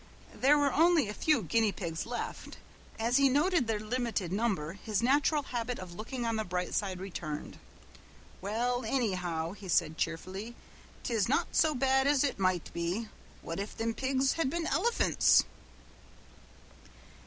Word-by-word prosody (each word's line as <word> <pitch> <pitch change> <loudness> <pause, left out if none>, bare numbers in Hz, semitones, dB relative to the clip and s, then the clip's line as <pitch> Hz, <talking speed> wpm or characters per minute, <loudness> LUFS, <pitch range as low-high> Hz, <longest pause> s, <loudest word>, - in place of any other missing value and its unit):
There 285 +3 +4
were 285 -2 +2
only 325 -4 +4
a 210 - -4
few 300 -1 +2
guinea 220 +4 +2
pigs 170 -3 -4
left. 240 0 -5 0.4
As 235 +3 +2
he 275 -1 +5
noted 295 0 +2
their 220 -2 0
limited 220 -5 -2
number 195 -7 -1
his 210 +2 -2
natural 290 +3 +3
habit 245 -1 -3
of 185 -2 -8
looking 235 +6 -5
on 230 -1 0
the 220 - 0
bright 180 -2 -3
side 190 -3 -1
returned. 170 -5 -6 0.8
"Well, 240 +5 -1
annyhow," 180 -10 -1
he 200 -2 -10
said 160 -3 +1
cheerfully, 190 +7 -4 0.5
"'tis 225 -3 0
not 315 +6 +1
so 310 -2 +3
bad 265 +1 +2
as 285 -1 +4
ut 280 -7 -1
might 185 -3 0
be. 175 +6 -2 0.3
What 165 +3 -5
if 200 +1 -4
thim 225 0 -2
dago - - -21
pigs 265 0 +1
had 325 -5 0
been 335 +3 -2
elephants!" 455 +9 +3
225 Hz, 155 wpm, -31 LUFS, 185-270 Hz, 0.8 s, he